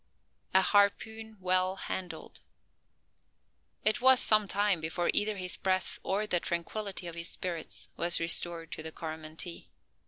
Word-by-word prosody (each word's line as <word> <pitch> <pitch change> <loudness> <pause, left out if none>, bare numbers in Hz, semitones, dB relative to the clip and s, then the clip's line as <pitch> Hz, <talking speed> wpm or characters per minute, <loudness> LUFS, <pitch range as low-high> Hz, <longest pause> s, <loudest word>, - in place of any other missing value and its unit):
A 190 - +7
HARPOON 220 +3 +1
WELL 185 +1 +1
HANDLED. 180 -4 -6 1.4
It 215 +3 +3
was 260 0 +7
some 215 -1 +3
time 200 -3 +1
before 165 +2 0
either 210 0 +2
his 180 -1 0
breath 185 -1 0
or 205 +3 -1
the 180 -4 +1
tranquillity 185 +3 -4
of 170 - -6
his 170 0 -5
spirits 170 -3 -5
was 170 0 +4
restored 165 0 +2
to - - -4
the 160 0 -6
Coromantee. 160 +2 -5
185 Hz, 135 wpm, -30 LUFS, 170-205 Hz, 1.4 s, A